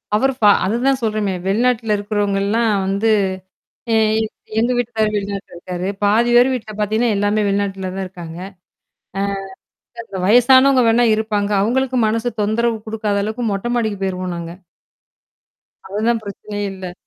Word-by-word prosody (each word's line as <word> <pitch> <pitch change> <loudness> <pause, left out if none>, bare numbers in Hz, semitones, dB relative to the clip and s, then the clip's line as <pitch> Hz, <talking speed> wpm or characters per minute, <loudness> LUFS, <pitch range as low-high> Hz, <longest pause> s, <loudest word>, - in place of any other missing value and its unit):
அவரு 270 +5 +2
ப - - +6 0.2
அதுதான் 255 +6 +1
சொல்றேமே! 215 -3 0
வெளிநாட்டுல 225 +1 +1
இருக்கிறவங்கல்லாம் 205 +2 0 0.2
வந்து 200 +3 +1 0.8
ஏ, - - +4 0.3
எ - - 0 0.3
எங்க 235 +2 +2
வீட்டுகாரர் 220 -3 0
வெளிநாட்டுல 200 -2 -4
இருக்காரு. 180 +1 -5 0.2
பாதி 220 +4 +3
பேர் 245 +2 +6
வீட்ல 220 -3 -5
பாத்தீங்கன்னா, 220 +2 +1
எல்லாமே 205 +1 +1
வெளிநாட்டுல 195 -1 -1
தான் 195 0 -3
இருக்காங்க. 175 -2 -9 1.6
ஆ, - - -9
இந்த 190 - -6
வயசானவங்க 260 +5 +6
வேணா 235 +2 +4
இருப்பாங்க. 210 -2 -1
அவுங்களுக்கும் 250 +2 +1
மனசு 225 +2 0
தொந்தரவு 225 +2 0
குடுக்காத 215 -2 -1
அளவுக்கு, 220 +3 -3
மொட்ட 195 +4 -3
மாடிக்கு 220 -4 -1
போயிருவோம் 185 -1 -3
நாங்க. 170 0 -6 1.3
அதுலாம் 220 +4 0
பிரச்சனயே 205 0 -7
இல்ல. 185 -2 -7
215 Hz, 135 wpm, -19 LUFS, 200-235 Hz, 1.6 s, ப